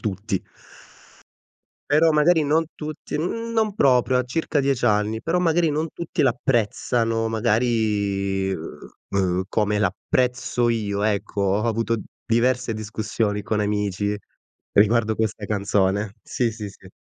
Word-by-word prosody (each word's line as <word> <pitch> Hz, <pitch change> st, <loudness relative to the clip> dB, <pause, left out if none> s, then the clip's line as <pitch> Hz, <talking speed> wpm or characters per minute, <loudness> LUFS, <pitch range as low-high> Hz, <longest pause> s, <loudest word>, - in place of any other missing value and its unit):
tutti. 100 Hz, -2 st, -2 dB, 1.5 s
Però 160 Hz, +2 st, +5 dB
magari 155 Hz, +1 st, +4 dB
non 160 Hz, +3 st, +2 dB
tutti 155 Hz, -1 st, -5 dB
mhmm, 230 Hz, +8 st, -3 dB
non 220 Hz, -3 st, +1 dB
proprio, 130 Hz, -, +3 dB
ha -, -, +2 dB
circa 145 Hz, +4 st, -1 dB
10 135 Hz, -3 st, 0 dB
anni, 105 Hz, 0 st, +1 dB
però 170 Hz, +8 st, 0 dB
magari 165 Hz, -1 st, +2 dB
non 155 Hz, +2 st, -1 dB
tutti 170 Hz, -1 st, -2 dB
l'apprezzano, 115 Hz, -2 st, +1 dB
magari, 105 Hz, -4 st, 0 dB
uhm, 90 Hz, +2 st, -3 dB
come 105 Hz, -1 st, +1 dB
l'apprezzo 120 Hz, +4 st, 0 dB
io, 105 Hz, -3 st, -1 dB
ecco. 105 Hz, -1 st, -1 dB
Ho 100 Hz, +2 st, +1 dB
avuto 115 Hz, 0 st, 0 dB, 0.3 s
diverse 120 Hz, +1 st, +1 dB
discussioni 110 Hz, -1 st, -2 dB
con 105 Hz, +1 st, -1 dB
amici 105 Hz, -1 st, -1 dB, 0.6 s
riguardo 110 Hz, +1 st, +3 dB
questa 110 Hz, -1 st, -2 dB
canzone. 100 Hz, 0 st, 0 dB
Sì, 120 Hz, -2 st, -1 dB
sì, 105 Hz, -2 st, -6 dB
sì. 95 Hz, -1 st, -15 dB
110 Hz, 125 wpm, -23 LUFS, 105-130 Hz, 1.5 s, Però